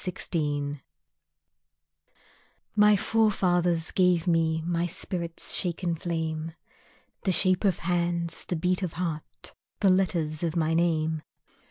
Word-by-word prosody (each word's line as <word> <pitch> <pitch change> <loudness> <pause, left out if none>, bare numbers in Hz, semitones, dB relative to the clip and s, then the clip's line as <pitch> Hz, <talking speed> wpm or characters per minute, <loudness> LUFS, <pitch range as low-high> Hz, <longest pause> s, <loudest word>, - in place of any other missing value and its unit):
Driftwood 145 -6 -2 1.9
My 210 0 +6
forefathers 180 -6 +2
gave 180 -3 +3
me 165 -2 +1
My 170 +1 0
spirit's 170 -1 -3
shaken 175 -1 0
flame, 160 -1 -3 0.7
The 190 - +1
shape 185 +2 +2
of 190 -4 +2
hands, 170 -1 0
the 180 - -2
beat 180 +3 0
of 180 -4 -3
heart, 165 -3 -5 0.3
The 195 -2 +4
letters 170 -5 0
of 170 -1 -1
my 160 -1 +1
name. 160 -2 +1
170 Hz, 115 wpm, -27 LUFS, 160-180 Hz, 1.9 s, My